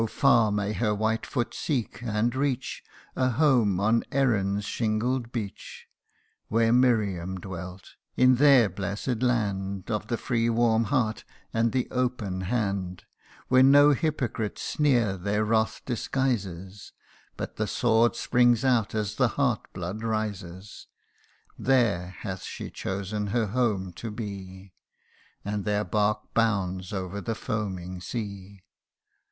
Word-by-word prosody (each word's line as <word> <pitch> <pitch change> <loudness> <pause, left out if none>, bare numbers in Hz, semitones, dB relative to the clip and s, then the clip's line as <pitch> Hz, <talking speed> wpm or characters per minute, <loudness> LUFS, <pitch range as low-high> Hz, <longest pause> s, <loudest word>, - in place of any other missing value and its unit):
far 120 -6 +4
may 105 0 -1
her 105 -2 0
white 110 +2 -1
foot 120 -2 -2
seek, 125 -6 -2
and 115 0 0
reach, 135 -2 -2 0.3
A 130 0 +2
home 120 - +3
on 110 +3 +2
Erin's 105 -7 +1
shingled 115 +3 -1
beach! 110 -6 -6 0.6
Where 115 +1 +2
Miriam 100 -8 +2
dwelt 90 0 -8 0.3
in 130 0 +5
their 135 -4 +6
bless'd 100 +5 -3
land 100 -5 -1
Of 105 -1 -2
the 120 - -1
free 115 -1 0
warm 115 -1 +2
heart, 115 -6 0 0.3
and 115 0 +2
the 130 -1 0
open 120 -7 -1
hand; 95 -4 -2 0.4
Where 130 0 +5
no 145 +2 +7
hypocrite 135 -8 -1
sneer 120 -10 +1
their 100 +4 0
wrath 110 0 +1
disguises, 105 -7 -3 0.4
But - - -6
the 110 - -1
sword 115 0 +2
springs 120 0 +3
out 120 -5 +2
as 105 -1 -2
the 130 - +4
heart's 130 -6 0
blood 95 +4 -5
rises; 100 -4 -4 0.7
CANTO - - -9
IV. - - -8
139 110 -8 +2
There - - -9 0.2
hath 95 - -6
she - - -7
chosen 100 +2 -3
her 110 +2 +1
home 100 -5 -1
to 115 - -5
be: 100 -3 -8 0.7
And 105 0 -2
their 105 0 0
bark 105 0 -1
bounds 95 -5 0
over 95 0 -4
the 115 +1 -3
foaming 95 -5 -4
sea. 100 -2 -6
110 Hz, 135 wpm, -27 LUFS, 100-120 Hz, 0.7 s, no